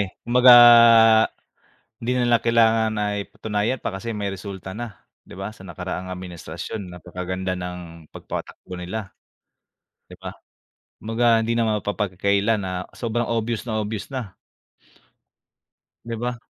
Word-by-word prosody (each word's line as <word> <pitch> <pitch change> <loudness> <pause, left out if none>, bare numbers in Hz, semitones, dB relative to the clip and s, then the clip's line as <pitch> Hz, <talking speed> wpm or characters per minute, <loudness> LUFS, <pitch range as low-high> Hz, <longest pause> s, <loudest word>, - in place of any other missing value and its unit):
eh, 100 -2 -4
kumbaga, 125 +1 +7 1.5
hindi 125 +2 -1
nila 120 -1 +2
kailangan 115 -1 +3
na 105 - 0 0.3
patunayan 110 +4 -2
pa 110 - -5
kasi 105 +5 -6
may 105 -3 -3
resulta 95 -1 -8
na, 115 -2 -8 0.2
'di - - -14
ba 100 +3 -6
,sa 105 - -17
nakaraang 95 0 -6
administrasyon 90 +2 -7
napakaganda 90 +2 -5
ng 90 -3 -8
pagpatakbo 90 - -8
nila, 95 +3 -6 1.0
'di - - -12
ba? - - -8 0.7
Kumbaga 115 +1 +2
hindi 115 +1 -1
naman 110 -3 +1
mapapagkaila 100 +1 0
na 90 -1 -4
sobrang 120 0 -2
obvious 115 0 -2
na 110 -2 -2
obvious 105 0 -5
na. 110 -8 -5 1.7
'Di 115 0 -5
ba? 120 +1 -4
105 Hz, 125 wpm, -23 LUFS, 95-115 Hz, 1.7 s, kumbaga